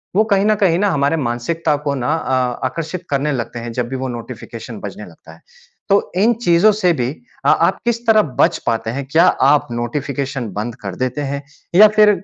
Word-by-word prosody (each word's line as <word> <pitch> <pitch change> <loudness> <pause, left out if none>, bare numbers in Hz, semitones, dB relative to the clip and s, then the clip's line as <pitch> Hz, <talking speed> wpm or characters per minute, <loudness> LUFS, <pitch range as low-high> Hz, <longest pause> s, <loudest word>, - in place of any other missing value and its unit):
वो 215 - +5
कहीं 200 -1 +3
न 215 - +4
कहीं 170 -4 +3
ना 205 - +2
हमारे 145 -2 +1
मानसिकता 140 +4 -1
को 140 - 0
ना 125 -2 -3
आ 150 -4 0 0.3
आकर्षित 165 +6 -4
करने 140 +1 0
लगते 120 -2 -4
हैं 115 0 -6
जब 120 0 -2
भी 135 - -4
वो 130 0 -3
नोटिफ़िकेशन 120 -1 -8
बजने - - -7
लगता - - -15
है। - - -19 0.5
तो 200 +1 +2
इन 225 +5 +4
चीज़ों 175 +3 +5
से 200 -4 +2
भी 125 -5 -1 0.4
अ, - - +5
आप - - +3
किस 235 -1 +1
तरह 215 -1 +6 0.2
बच - - +4
पाते 115 -1 -1
हैं? 135 +4 -4
क्या 165 +2 +5
आप 140 +2 +3
नोटिफ़िकेशन 135 +1 -3
बंद 110 +4 -4
कर 100 -3 -5
देते 130 +5 -2
हैं? 140 0 -3 0.3
या 215 +3 +9
फिर 210 -1 +6
140 Hz, 205 wpm, -18 LUFS, 125-180 Hz, 0.5 s, या